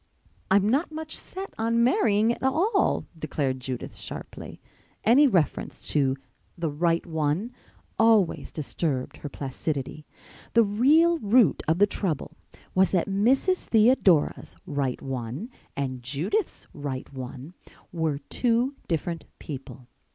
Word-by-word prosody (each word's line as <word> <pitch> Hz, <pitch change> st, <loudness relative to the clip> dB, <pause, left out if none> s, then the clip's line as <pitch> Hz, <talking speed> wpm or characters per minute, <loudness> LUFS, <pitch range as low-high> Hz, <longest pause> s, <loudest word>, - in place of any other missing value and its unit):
"I'm 195 Hz, +1 st, +4 dB
not 280 Hz, +9 st, +1 dB
much 315 Hz, 0 st, -5 dB
set 385 Hz, +1 st, -7 dB
on 230 Hz, +1 st, +2 dB
marrying 225 Hz, -2 st, +3 dB
at -, -, -10 dB
all," 350 Hz, -, +2 dB
declared 140 Hz, -4 st, -2 dB
Judith 130 Hz, -1 st, -5 dB
sharply. -, -, -8 dB, 0.4 s
Any 270 Hz, +6 st, +6 dB
reference 180 Hz, -, -1 dB
to 135 Hz, -3 st, +2 dB, 0.4 s
the 165 Hz, -3 st, -1 dB
"right 165 Hz, +3 st, +1 dB
one" 160 Hz, +7 st, -1 dB, 0.5 s
always 225 Hz, -5 st, +3 dB
disturbed 145 Hz, -3 st, -3 dB
her 145 Hz, -, -7 dB
placidity. 140 Hz, +1 st, -4 dB, 0.5 s
The 230 Hz, -, +7 dB
real 300 Hz, +11 st, +4 dB
root 215 Hz, -, +4 dB
of 160 Hz, +2 st, +3 dB
the 205 Hz, -, +6 dB
trouble 160 Hz, -6 st, -3 dB, 0.4 s
was 190 Hz, 0 st, +4 dB
that 180 Hz, -3 st, +1 dB
Mrs. 255 Hz, -, +2 dB
Theodora's 215 Hz, -, +3 dB
"right 140 Hz, -4 st, -2 dB
one" 135 Hz, -, -5 dB, 0.3 s
and 130 Hz, -2 st, -3 dB
Judith's 150 Hz, -, -2 dB
"right 140 Hz, -2 st, -5 dB
one" 130 Hz, +4 st, -8 dB, 0.4 s
were 160 Hz, -4 st, 0 dB
two 235 Hz, -, 0 dB
different 165 Hz, 0 st, -2 dB
people. 135 Hz, -3 st, -9 dB
175 Hz, 120 wpm, -26 LUFS, 145-235 Hz, 0.5 s, The